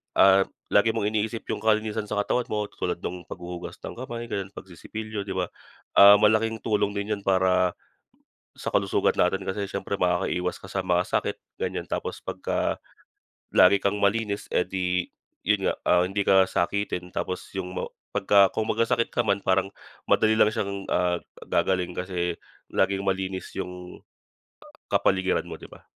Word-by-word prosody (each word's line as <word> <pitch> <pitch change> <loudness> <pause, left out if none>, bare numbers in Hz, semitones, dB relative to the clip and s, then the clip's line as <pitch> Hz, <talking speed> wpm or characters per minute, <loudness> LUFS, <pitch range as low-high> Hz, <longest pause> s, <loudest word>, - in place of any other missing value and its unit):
ah, 95 0 +6 0.3
lagi 110 +2 +4
mong 105 -2 +1
iniisip 110 +1 -2
yung - - -2
kalinisan 110 -1 +1
sa 105 -1 0
katawan 125 +3 0
mo, 105 -1 -2
tulad - - -3
nung 90 0 -5
paghuhugas 90 0 -7
ng - - -7
kamay, 120 -2 -6
gano'n 100 -2 -4
pagsisipilyo, 105 +3 -7
'di 95 - -3
ba? 90 -2 -1 0.5
Ah, 100 +1 +10
malaking 110 +1 +3
tulong 105 -2 +1
din 100 +1 -3
yun 100 - -12
para 90 -1 +3 0.8
sa - - -7
kalusugan - - +2
natin 95 +2 +1
kasi 100 +2 -2
siyempre, 100 +1 -3
makakaiwas 90 0 0
ka - - -10
sa 95 - -1
mga 90 0 +2
sakit, - - 0 0.2
ganiyan. - - -3
Tapos - - -3
pagka - - -2 0.8
lagi 95 +2 +7
kang 100 +1 +1
malinis, 105 0 +1
eh, - - +2
di 90 -1 -1 0.4
yun - - +2
nga, - - 0
ah, 90 0 +5
hindi 100 +1 -1
ka 95 -1 +5
sakitin. 90 -1 -1
Tapos 90 - -4
yung 90 -1 -3
ma - - -2 0.3
pagka 100 -1 +5
kung 110 - -1
magkasakit 115 +1 +1
ka 120 - +2
man, 100 -2 +1
parang 95 +1 +2 0.4
madali 110 0 +4
lang 105 - +5
siyang, 100 -2 -4
ah, 90 -1 +2 0.3
gagaling 90 0 0
kasi 90 -1 -2 0.4
laging 100 0 +1
malinis 95 -1 -2
yung 90 0 -7 0.9
kapaligiran 95 -1 +2
mo, - - -7
di - - -11
ba? - - -15
95 Hz, 160 wpm, -26 LUFS, 90-105 Hz, 0.9 s, Ah